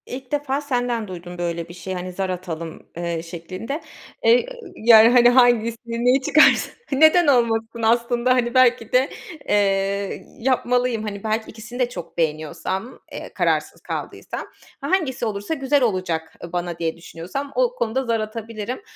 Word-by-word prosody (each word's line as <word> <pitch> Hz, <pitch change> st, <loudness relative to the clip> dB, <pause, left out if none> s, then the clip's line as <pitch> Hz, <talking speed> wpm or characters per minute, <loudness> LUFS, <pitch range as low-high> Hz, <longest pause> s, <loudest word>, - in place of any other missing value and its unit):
İlk 255 Hz, 0 st, -8 dB
defa 290 Hz, -1 st, -1 dB
senden 245 Hz, -5 st, -1 dB
duydum 175 Hz, -1 st, -8 dB
böyle 170 Hz, -1 st, -3 dB
bir -, -, -9 dB
şeyi, 185 Hz, +2 st, -6 dB
hani, 180 Hz, 0 st, -5 dB
zar 190 Hz, +1 st, -2 dB
atalım, 170 Hz, -3 st, -5 dB, 0.2 s
eee, 170 Hz, -1 st, -2 dB
şeklinde. 185 Hz, -, -6 dB, 0.4 s
Eee, 475 Hz, +1 st, +5 dB, 0.2 s
ııı, -, -, -11 dB
yani, 225 Hz, 0 st, +7 dB
hani, 245 Hz, 0 st, +6 dB
hangisini, 235 Hz, -1 st, +2 dB
neyi 255 Hz, +2 st, +4 dB
çıkarsa 305 Hz, +3 st, +4 dB, 0.2 s
neden 315 Hz, +4 st, +5 dB
olmasın 230 Hz, -3 st, +2 dB
aslında, 235 Hz, +2 st, +2 dB
hani, 240 Hz, -1 st, 0 dB
belki 250 Hz, -3 st, +3 dB
de, 255 Hz, +2 st, +4 dB, 0.4 s
eee, 195 Hz, -1 st, 0 dB
yapmalıyım. 245 Hz, -2 st, +1 dB
Hani 200 Hz, -2 st, -5 dB
,belki 220 Hz, 0 st, -1 dB
ikisini 235 Hz, +3 st, -9 dB
de 250 Hz, -1 st, +2 dB
çok 175 Hz, -8 st, -9 dB
beğeniyorsam, 165 Hz, -, -3 dB
eee, -, -, -8 dB
kararsız -, -, 0 dB
kaldıysam, -, -, -6 dB, 0.4 s
hangisi 280 Hz, -5 st, 0 dB
olursa, 205 Hz, +5 st, -3 dB
güzel 280 Hz, -1 st, +1 dB
olacak, 175 Hz, -7 st, -1 dB
eee, 170 Hz, -, -8 dB
bana 175 Hz, -1 st, -3 dB
diye 165 Hz, -1 st, -2 dB
düşünüyorsam 180 Hz, +12 st, -6 dB
o -, -, +1 dB
konuda 260 Hz, -, -1 dB
zar 230 Hz, -1 st, 0 dB
atabilirim 220 Hz, -, -5 dB
230 Hz, 150 wpm, -22 LUFS, 185-255 Hz, 0.4 s, yani